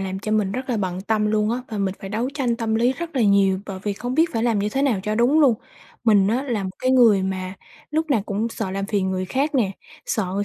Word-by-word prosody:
làm 190 0 -3
cho 215 +2 -3
mình 205 -3 +1
rất 255 +1 -4
là 240 - 0
bận 185 -3 -2
tâm 215 +1 0
luôn 210 0 +1
á, 240 - 0
và 215 - -4
mình 195 -1 -1
phải 195 - -7
đấu 225 +5 -1
tranh 245 -5 0
tâm 225 -1 -1
lý 240 +3 +3
rất 335 +1 -6
là 245 - +3
nhiều 200 -2 +4
bởi 195 -2 -6
vì 205 - -1
không 245 +5 -4
biết 325 +2 +3
phải 225 - -1
làm 230 -3 +2
như 205 +1 0
thế 270 +5 -1
nào 250 -9 +1
cho 210 +2 -1
đúng 250 +7 +3
luôn. 270 -6 +5 0.5
Mình 205 -4 +5
á 245 +5 +1
là 235 -7 -2
một 190 - -3
cái 255 - +1
người 230 -7 +5
mà 185 -1 -3 0.4
lúc 315 +1 -1
nào 230 -7 +2
cũng 210 +3 -1
sợ 220 -4 -4
làm 195 +1 -3
phiền 200 -3 0
người 185 0 -2
khác 275 +9 -1
nè, 230 -8 +2 0.4
sợ 215 - 0
người 200 +1 0
215 Hz, 280 wpm, -22 LUFS, 195-245 Hz, 0.5 s, luôn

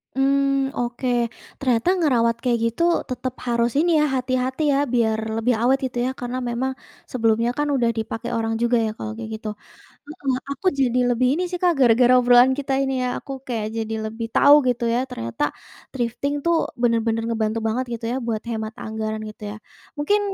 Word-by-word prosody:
Mmm, 275 0 +2
oke. 240 +1 -2 0.5
Ternyata 250 +2 +1
ngerawat 235 -7 +2
kayak 240 -2 +1
gitu 235 +9 0 0.3
tetap 255 0 -3
harus 235 0 +1
ini 345 +2 +3
ya 300 - +4
hati-hati 255 +2 -1
ya - - +2 0.2
biar 220 -2 +2 0.2
lebih 245 +2 +2
awet 260 +3 +4
gitu 245 -1 -5
ya - - 0
karena 245 +1 -4
memang 260 +3 -1 0.4
sebelumnya 230 -1 +2
kan 295 - +1
udah 240 -3 +2
dipakai 225 0 -4
orang 225 0 -1
juga 240 0 +3
ya - - -1
kalau 215 - -5
kayak 225 -1 -6
gitu. 215 0 -8 0.6
Heeh, 285 -4 -2 0.2
aku 280 +7 -5
jadi 250 -1 +2
lebih 245 +1 +2
ini 345 +5 0
sih 360 - -3
Kak 355 -1 +4
gara-gara 245 0 +5
obrolan 245 +1 +6
kita 275 -1 -2
ini 270 0 -1
ya 250 - 0
aku 275 - -8 0.2
kayak 225 -3 -2
jadi 225 0 -2
lebih 225 +1 -4
tahu 285 +1 +7
gitu 240 -1 0
ya - - +2
ternyata 115 +3 -5 0.5
thrifting 250 +3 -2
tuh 340 0 +3 0.3
benar-benar 230 -1 +1
ngebantu 220 -1 -1
banget 245 +4 0
gitu 230 0 -5
ya - - -1
buat 220 -2 -2
hemat 220 -1 -4
anggaran 220 0 -3
gitu 215 - -13
ya. 205 - -6 0.4
Mungkin 410 +8 +2
240 Hz, 185 wpm, -22 LUFS, 225-265 Hz, 0.6 s, tahu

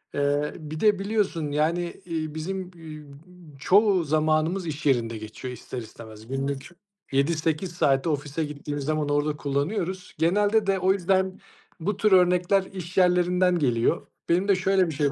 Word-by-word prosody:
Eee, 145 +1 0
bir 155 0 -7
de 210 -3 +3
biliyorsun, 195 -7 -1
yani, 160 +4 +1 0.2
eee, 160 -3 -4
bizim, 185 +3 -4
eee, 155 -2 -10 0.6
çoğu 195 +2 +4
zamanımız 155 +4 +1
iş 150 -1 -5
yerinde 115 -4 +1
geçiyor 110 +4 -7
ister 125 - -8
istemez. 110 -1 -11
Günlük 135 +1 -3 0.4
7-8 155 +5 0
saati 135 -2 +2
ofise 145 +1 -2
gittiğimiz 145 0 -5
zaman 155 -1 -1
orada 145 +1 0
kullanıyoruz. 180 +6 -2
Genelde 205 +5 +2
de, 195 -1 +2
o 190 +1 +3
yüzden 190 0 0 0.4
bu 195 +4 -2
tür 210 0 +2
örnekler 180 +1 +4
iş 180 -1 -7
yerlerinden 180 0 +3
geliyor. 125 +3 +1 0.2
Benim 180 +4 +2
de 200 - +5
şöyle 185 0 +2
bir 160 - -4
şey 145 -1 +1
160 Hz, 150 wpm, -25 LUFS, 145-185 Hz, 0.6 s, de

